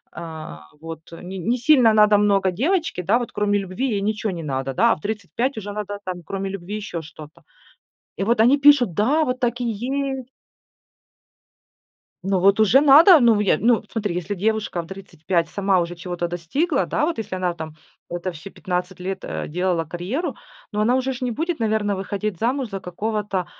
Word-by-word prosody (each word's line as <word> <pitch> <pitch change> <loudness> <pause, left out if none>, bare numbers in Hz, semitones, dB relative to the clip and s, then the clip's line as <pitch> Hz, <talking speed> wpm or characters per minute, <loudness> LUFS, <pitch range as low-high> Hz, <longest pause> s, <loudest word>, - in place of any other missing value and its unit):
а, 160 - -8 0.2
вот, 160 0 -9
не 180 +3 -8
не 230 +8 0
сильно 255 -3 +5
надо 210 -1 +5
много 200 -2 +2
девочке, 320 - -1
да 205 +7 +3
вот, 240 - -5
кроме 205 0 +1
любви 195 +8 -3
ей 205 -4 -1
ничё 215 +1 -1
не 170 -4 -5
надо 135 -2 -3
да, - - +4
а - - +3
в - - -17
35 220 - -3
уже 205 -1 -5
надо 205 -1 -5
там 180 -1 -5
кроме 195 +3 -4
любви 195 +1 -6
еще 200 -5 -5
что-то. 155 -1 -13 0.7
И - - -3
вот 230 +1 +2
они 245 +5 +6
пишут: 280 - +5
"Да, 275 - +2
вот 255 -2 -2
так 245 -1 -1
и - - -1
есть". 260 +3 -3 2.0
Ну 195 -1 +2
вот 195 +2 +4
уже 220 +5 +5
надо, 300 +4 +8
ну 230 -3 +5
я 205 - +2
ну, 235 0 +3
смотри, 210 -5 -2
если 180 +3 -3
девушка 215 -1 -1
в 165 - -8
35 175 -2 -3
сама 195 -2 +1
уже 170 0 -3
чего-то 175 0 -4
достигла, 270 - -1
да - - 0
вот, 335 -3 -2
если 220 -4 -4
она 185 -1 -1
там 160 -2 -8 0.3
это 175 +1 -4
всё 160 +3 -10
15 180 -1 -4
лет, 190 +1 -4
э, - - -4
делала 175 0 -1
карьеру, 180 - -4 0.4
ну 210 - -1
она 230 +4 +3
уже 260 0 -1
ж 255 - -8
не 250 -2 -1
будет, 325 +6 -2
наверно, 215 -2 0
выходить 195 0 -3
замуж 250 +2 -1
за 195 -1 -5
какого-то 200 0 -3
205 Hz, 190 wpm, -22 LUFS, 180-240 Hz, 2.0 s, надо